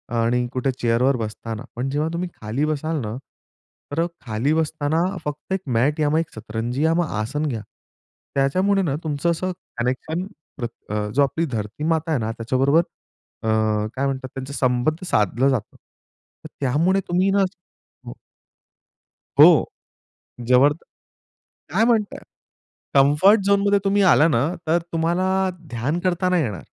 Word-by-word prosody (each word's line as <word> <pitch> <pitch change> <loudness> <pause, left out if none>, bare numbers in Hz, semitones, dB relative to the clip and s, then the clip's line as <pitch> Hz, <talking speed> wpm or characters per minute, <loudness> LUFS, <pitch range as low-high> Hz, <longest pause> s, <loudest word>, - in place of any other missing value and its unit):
आणि 120 +2 +1
कुठे 130 +1 0
चेअर 115 0 +1
वर 135 0 +3
बसताना 110 0 -5
पण 125 +3 -2
जेव्हा 150 +3 -1
तुम्ही 175 +1 -3
खाली 110 +7 -1
बसाल 155 +1 -2
ना 110 -1 -4 0.8
तर 165 +4 +1 0.2
खाली 115 +6 0
बसताना 160 0 0 0.3
फक्त 150 +5 -4
एक 190 - -1 0.2
मॅट 145 +6 +1
या 150 -1 +2
मग 155 - +3
एक 165 - -3
सतरंजी 115 +6 -3
आसन 150 -4 0
घ्या. 115 -6 -3 0.7
त्याच्यामुळे 185 +9 +2
ना 145 -7 0
तुमचं 155 +2 0
असं 185 +2 -2 0.3
कनेक्शन 130 +9 -2 0.3
पर 120 - -2 0.3
अ, 105 0 -1
जो 140 - +5
आपली 160 +4 0
धरती 115 +1 -5
माता 160 0 -2
आहे 145 - +1
ना 110 0 -2
त्याच्याबरोबर 130 +7 +2 0.6
अ, 110 - -2 0.5
काय 135 - 0
म्हणतात 135 -1 -2
त्याचा 135 +1 -6
संबंध 130 +5 0
साधलं 120 +2 +2
जातं. 125 -6 -2 0.7
तर - - -7
त्यामुळे 165 +9 +2
तुम्ही 180 +2 +2
ना 200 0 +3 0.6
हो. - - -7 1.3
हो. - - +11 1.0
जोवर 135 +4 +6 1.0
काय 210 +6 +3
म्हणताय? 220 -4 +1 0.8
कम्फर्ट 150 +10 +5
झोनमध्ये 200 0 +3
तुम्ही 200 +1 +3
आला 155 - +5
ना 145 -4 +2 0.2
तर 165 +2 +3
तुम्हाला 170 +3 +1 0.4
ध्यान 135 +8 -2
करता 185 0 +1
नाही 180 -3 +2
येणार. 105 -8 -4
145 Hz, 145 wpm, -22 LUFS, 125-165 Hz, 1.3 s, हो